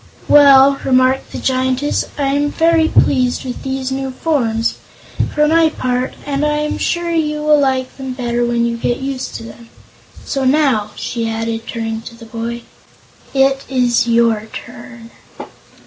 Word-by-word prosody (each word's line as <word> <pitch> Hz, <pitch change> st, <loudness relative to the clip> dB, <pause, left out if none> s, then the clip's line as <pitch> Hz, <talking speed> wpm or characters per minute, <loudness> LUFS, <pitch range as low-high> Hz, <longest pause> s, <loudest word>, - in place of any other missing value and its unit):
"Well," 275 Hz, -1 st, +6 dB
remarked 255 Hz, 0 st, +2 dB
the -, -, -6 dB
Giantess, 260 Hz, +2 st, 0 dB
"I'm 285 Hz, +1 st, 0 dB
very 330 Hz, 0 st, +3 dB
well -, -, +4 dB
pleased 255 Hz, -1 st, 0 dB
with 250 Hz, -, -6 dB
these 265 Hz, -1 st, -3 dB
new 270 Hz, 0 st, -3 dB
forms, 250 Hz, -5 st, -1 dB, 0.6 s
for 300 Hz, 0 st, +3 dB
my 325 Hz, +1 st, +4 dB
part, 255 Hz, -3 st, -2 dB
and 280 Hz, 0 st, -2 dB
I'm 300 Hz, 0 st, -1 dB
sure 345 Hz, 0 st, -1 dB
you 300 Hz, -2 st, -1 dB
will 300 Hz, -1 st, +4 dB
like 260 Hz, -2 st, -1 dB
them 265 Hz, -1 st, -5 dB
better 240 Hz, -2 st, -1 dB
when 235 Hz, 0 st, +1 dB
you 235 Hz, 0 st, -2 dB
get 240 Hz, +1 st, -1 dB
used 270 Hz, -1 st, -5 dB
to -, -, -6 dB
them. 230 Hz, 0 st, -12 dB, 0.6 s
So 275 Hz, -1 st, -2 dB
now," 260 Hz, -6 st, +2 dB
she 230 Hz, -2 st, -3 dB
added, 225 Hz, 0 st, -3 dB
turning 225 Hz, -1 st, -4 dB
to 230 Hz, 0 st, -11 dB
the 230 Hz, 0 st, -13 dB
boy, 230 Hz, +1 st, -5 dB, 0.7 s
"it 270 Hz, 0 st, +2 dB
is 245 Hz, -3 st, +2 dB
your 230 Hz, -2 st, +2 dB
turn." 235 Hz, -1 st, -10 dB
260 Hz, 155 wpm, -17 LUFS, 235-280 Hz, 0.7 s, Well